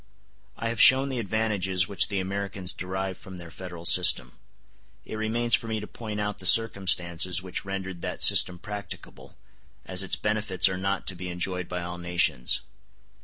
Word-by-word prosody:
I 115 0 -3
have 115 -1 -1
shown 135 +1 +6
the 130 -2 -3
advantages 100 -3 0
which 100 -2 +1
the 100 -2 -2
Americans 95 -1 -1
derive 95 0 -5
from 95 -1 -11
their 85 -2 -10
federal 90 -2 -9
system; 90 0 +3 0.7
it - - -7
remains 115 +2 -1
for 115 - +2
me 110 -1 -2
to 105 - -7
point 105 -1 -7
out 105 0 -3
the 95 - +1
circumstances 90 -4 +3
which 95 +1 -5
rendered 95 -2 -6
that - - -1
system 90 - +6
practicable, 105 +2 -9 0.5
as 95 0 +3
its 95 - 0
benefits 105 -3 +1
are 95 - -2
not 95 +1 -2
to 95 - -3
be 90 +1 -7
enjoyed 90 0 -3
by 90 -1 -4
all 90 0 -7
nations. 85 -8 +1
95 Hz, 170 wpm, -26 LUFS, 90-105 Hz, 0.7 s, shown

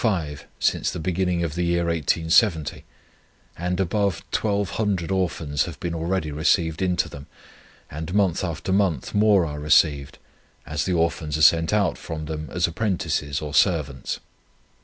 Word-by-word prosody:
5 80 - -1
since - - +1
the - - -5
beginning 90 +1 0
of 80 -3 -2
the 90 +2 -1
year 85 0 +1
1870, 80 - +2 0.7
and 90 +2 -2
above 95 0 0
1,200 100 -3 -1
Orphans 85 -6 0
have 85 -5 -8
been 85 -1 -3
already 85 -1 -2
received 80 +2 +1
into 90 -2 +1
them, 70 -1 -10 0.6
and 80 +3 -5
month 95 -4 +1
after 85 +1 -2
month 95 -9 0
more 105 -3 +4
are 75 -1 -5
received, 75 -2 +2 0.5
as 75 -1 -2
the 95 - 0
Orphans 80 -2 0
are 80 - +1
sent 80 0 +5
out 105 -4 +1
from 80 -2 -6
them 75 0 -5
as 90 0 +1
apprentices 85 -6 -1
or 75 -1 -5
servants. 75 -7 +1
85 Hz, 150 wpm, -24 LUFS, 75-95 Hz, 0.7 s, sent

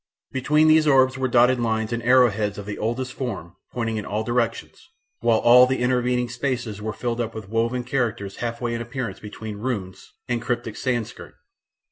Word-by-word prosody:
Between 150 +4 +3
these 155 0 +5
orbs 130 -2 +4
were 130 0 -1
dotted 125 +1 +4
lines 110 -1 -1
and 120 - -2
arrow 125 0 +5
heads 105 0 -2
of 100 - -7
the 105 0 -6
oldest 125 +4 -2
form 95 -10 -5 0.2
pointing 115 -2 -2
in 105 - -4
all 105 +2 -2
directions, 120 0 -2 0.3
while 115 -1 +3
all 125 +2 +7
the 130 +1 0
intervening 125 0 +1
spaces 120 -4 -3
were 110 +1 -3
filled 120 +3 -3
up 115 -1 -4
with 110 -3 -8
woven 115 +3 0
characters 120 -6 -2
half 120 -1 -3
way 120 -1 -2
in 115 - -3
appearance 120 +1 -5
between 105 0 -8
Runes 105 -6 -5
and 120 -1 -1
Cryptic 115 -2 -3
Sanskrit. 120 -4 -3
120 Hz, 185 wpm, -23 LUFS, 110-125 Hz, 0.3 s, all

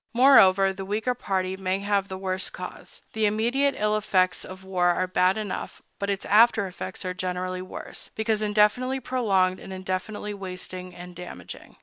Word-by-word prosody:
Moreover, 195 -7 +6
the 195 0 -6
weaker 215 +6 -1
party 190 -5 -2
may 190 0 -1
have 200 0 0
the 190 - -6
worse 185 0 -2
cause. - - -9
The 220 -1 +2
immediate 240 +7 +1
ill 210 0 +1
effects 185 -4 +1
of 185 0 -10
war 185 -2 +1
are 175 +1 +2
bad 185 +1 +2
enough, 210 -3 -5 0.2
but 200 - -2
its 195 -1 -2
after 220 -1 +5
effects 185 0 -7
are 185 - -2
generally 185 0 -3
worse, 185 - -7
because 220 -1 0
indefinitely 215 +5 +2
prolonged 195 -8 +1
and - - -10
indefinitely 190 +3 -4
wasting 185 -2 -7
and 175 0 -10
damaging. 170 - -9
195 Hz, 165 wpm, -26 LUFS, 185-215 Hz, 0.2 s, Moreover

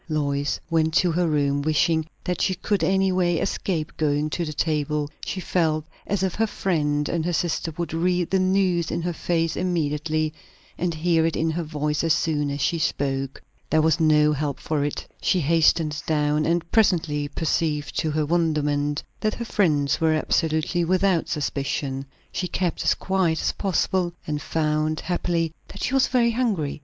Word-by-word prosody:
Lois 145 -2 -1
went 160 -1 +1
to 180 -1 +4
her 175 +1 +1
room, 145 -2 +1
wishing 155 +2 +2 0.2
that 180 - -2
she 190 - +1
could 190 0 -1
any 190 +2 +2
way 175 -2 +2
escape 160 -1 -2
going 150 0 0
to 175 - -1
the 155 - -3
table; 150 -1 0 0.2
she 190 - -3
felt 160 -4 0 0.2
as 200 -2 0
if 190 -2 0
her 225 +1 +1
friend 150 -8 0
and 170 -2 -1
her 175 - -1
sister 165 0 -1
would 170 -3 -3
read 175 +1 +1
the 190 - +3
news 185 -3 +2
in 170 - -2
her 175 0 -1
face 165 -1 0
immediately, 155 -3 -1 0.4
and 175 -1 -2
hear 165 0 +2
it 165 0 +1
in 160 +1 +1
her 170 +2 -2
voice 150 -1 -2
as 165 -2 +3
soon 150 -3 0
as 140 0 -3
she 165 +4 +1
spoke. 135 -3 -1 0.3
There 155 -1 +3
was 160 +1 +3
no 150 -1 +4
help 145 -1 -2
for 150 -2 -1
it; 145 - -3
she 185 - +2
hastened 155 -1 +2
down, 150 -1 +1
and 170 0 0
presently 165 -9 +2
perceived 150 -1 -1
to 160 - 0
her 155 0 0
wonderment 150 -3 0 0.2
that 215 -1 0
her 235 - -5
friends 155 -11 +1
were 160 -1 +3
absolutely 160 +2 +1
without 185 0 +2
suspicion. 140 -2 -2 0.2
She 180 - -2
kept 180 -1 -1
as - - +3
quiet 185 -4 0
as - - +1
possible, 185 -2 0
and 150 -1 -3
found, 155 0 0
happily, 170 -2 -1
that - - -8
she - - -1
was 270 -1 +4
very 240 -2 +3
hungry. 215 - -1
160 Hz, 180 wpm, -24 LUFS, 150-175 Hz, 0.4 s, to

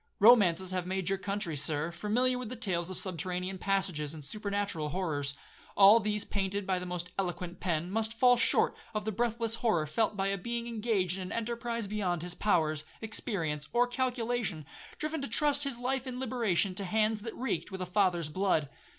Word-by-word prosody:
Romances 190 -5 +6
have 180 -1 -2
made 190 -1 -1
your 195 - +1
country, 195 -4 -2
Sir, 150 +3 0
familiar 220 +8 +1
with 250 -1 -6
tales 175 -5 0
of 185 - -4
subterranean 185 +1 -2
passages, 175 -7 0
and 150 -3 -9
supernatural 200 -5 -2
horrors. 145 -5 -1 0.4
All 205 +3 +9
these, 210 -1 -1
painted 200 0 -2
by 185 -1 0
the 180 - -6
most 180 0 -4
eloquent 175 -1 -3
pen, 170 -1 -1
must 225 +2 0
fall 245 +1 +6
short 245 - +2 0.2
of 210 -1 -2
the 220 - 0
breathless 230 +1 0
horror 210 -10 +2
felt 210 +7 0
by 195 0 +1
a 195 0 -1
being 235 +4 -2
engaged 215 -6 0
in - - -5
an - - -8
enterprise 235 0 -2
beyond 190 -5 -1
his 175 0 -3
powers, 155 -7 +1 0.2
experience, 165 -9 -2
or 240 +1 +4
calculation, 245 - -1 0.3
driven 310 0 -3
to 275 - -3
trust 290 +5 +2
his 275 -4 -2
life 260 +2 -1
and 250 -1 -4
liberation 220 -8 +1
to 195 +2 -3
hands 215 +2 +1
that 225 +1 -6
reeked 205 - -2
with 190 - -5
a 185 - -2
father's 180 -4 +1
blood. 160 -4 +1
195 Hz, 185 wpm, -31 LUFS, 175-230 Hz, 0.4 s, All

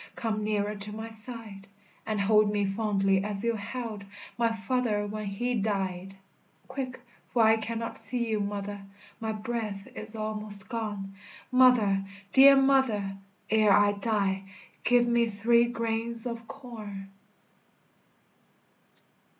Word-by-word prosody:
Come 215 -2 -2
nearer 210 -1 0
to 200 +1 -6
my 220 +2 -6
side, 220 -3 -6 0.4
And 215 -1 -1
hold 210 +1 +4
me 205 -1 +1
fondly, 195 -1 +1
as 205 0 +1
you 235 0 +2
held 220 -1 -5 0.3
My 230 -1 +2
father 225 -1 0
when 210 0 -5
he 240 +6 -2
died; 195 -3 -2 0.5
Quick, 260 -1 -5 0.3
for 235 - +3
I 220 0 +6
cannot 230 +1 -4
see 240 -2 -1
you, 220 -1 0
mother, 205 0 -4 0.4
My 220 -1 -2
breath 215 -2 -4
is 215 +1 -4
almost 215 -2 -4
gone; 205 -4 -4 0.4
Mother! 245 -7 +5 0.3
dear 275 +1 +9
mother! 265 -8 +2 0.4
ere 215 -2 +5
I 205 0 +5
die, 200 -2 -1 0.4
Give 245 0 +4
me 235 0 +3
three 235 +3 +3
grains 230 0 -2
of 235 -1 -5
corn. 205 -6 -9
215 Hz, 125 wpm, -28 LUFS, 200-235 Hz, 0.5 s, dear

